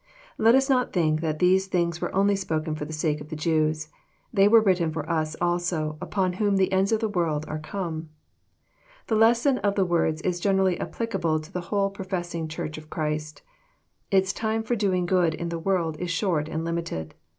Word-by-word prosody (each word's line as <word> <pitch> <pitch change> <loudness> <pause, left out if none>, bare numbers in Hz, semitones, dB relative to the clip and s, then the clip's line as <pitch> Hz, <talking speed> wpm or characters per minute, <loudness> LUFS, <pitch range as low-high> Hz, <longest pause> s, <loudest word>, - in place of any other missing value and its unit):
Let 225 +2 +6
us 270 0 +3
not 250 -2 +1
think 155 -3 +2
that 155 -2 -1
these 185 +3 +3
things 170 -2 -1
were - - -2
only 200 +1 +3
spoken 160 -5 -2
for 150 -1 -4
the 155 - -8
sake 155 -1 -1
of 150 - -10
the 160 - -5
Jews. 155 -1 0 0.4
They 200 -2 +5
were 225 +2 +7
written 185 -6 +2
for 155 -1 -4
us 160 -2 -1
also, 175 -3 0
upon 185 -3 -1
whom 205 -2 +3
the 190 -1 +2
ends 190 +2 +2
of 220 0 +1
the 220 - +1
world 165 -6 -1
are 155 - -4
come. 160 -1 -5 1.0
The 225 - 0
lesson 235 +4 +4
of 200 -1 0
the 195 - +2
words 165 -3 +1
is 180 -1 -1
generally 190 -1 +2
applicable 170 -9 -1
to 155 +3 -13
the 180 - -3
whole 200 -1 +1
professing 175 -4 -4
Church 155 0 -5
of 155 0 -15
Christ. 155 -1 -3 0.7
Its 190 -1 +2
time 220 0 -1
for 240 +2 0
doing 190 -5 +1
good 175 -3 +2
in 170 +1 -4
the 170 0 -3
world 165 -3 0
is 180 +2 -4
short 165 -3 0
and 160 +1 -3
limited. 165 - -3
175 Hz, 200 wpm, -25 LUFS, 155-195 Hz, 1.0 s, were